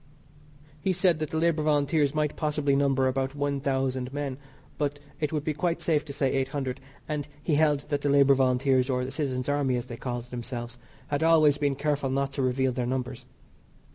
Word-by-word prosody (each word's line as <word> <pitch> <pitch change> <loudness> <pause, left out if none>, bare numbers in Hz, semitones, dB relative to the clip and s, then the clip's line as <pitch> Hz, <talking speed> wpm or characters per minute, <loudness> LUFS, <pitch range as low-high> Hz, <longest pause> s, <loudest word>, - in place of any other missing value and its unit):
He 190 - +1
said 180 -3 +2
the 155 0 -2
Labour 165 -1 +2
Volunteers 150 -1 +2
might 150 -1 0
possibly 150 -2 0
number 135 -1 +2
about 135 +1 -1
one 145 -1 -1
thousand 130 -2 -1
men, 140 -2 -4 0.4
but 145 -1 +1
that 145 - -18 0.2
it 150 -2 -1
would 150 -2 -1
be 155 - -1
quite 170 +3 -1
safe 155 -3 +1
to 145 - -7
say 135 -1 0
eight 135 -1 +1
hundred, 135 -2 -3 0.3
and 150 -2 -3 0.2
he 160 - 0
held 145 -1 +3
that 145 -2 0
the 145 - 0
Labour 140 -1 +6
Volunteers, 130 0 +2
or 125 -1 0
the 130 - -5
Citizens' 130 -5 -2
Army, 145 -3 +1
as 120 0 -2
they 120 -2 -8
called 120 -1 -5
themselves, 120 0 -6 0.3
had 145 0 0
always 155 -3 +5
been 145 -2 +1
careful 145 -1 -1
not 135 +1 -1
to 140 - -2
reveal 130 0 +1
their 125 -1 -2
numbers. 130 0 -3
140 Hz, 200 wpm, -27 LUFS, 130-150 Hz, 0.4 s, Labour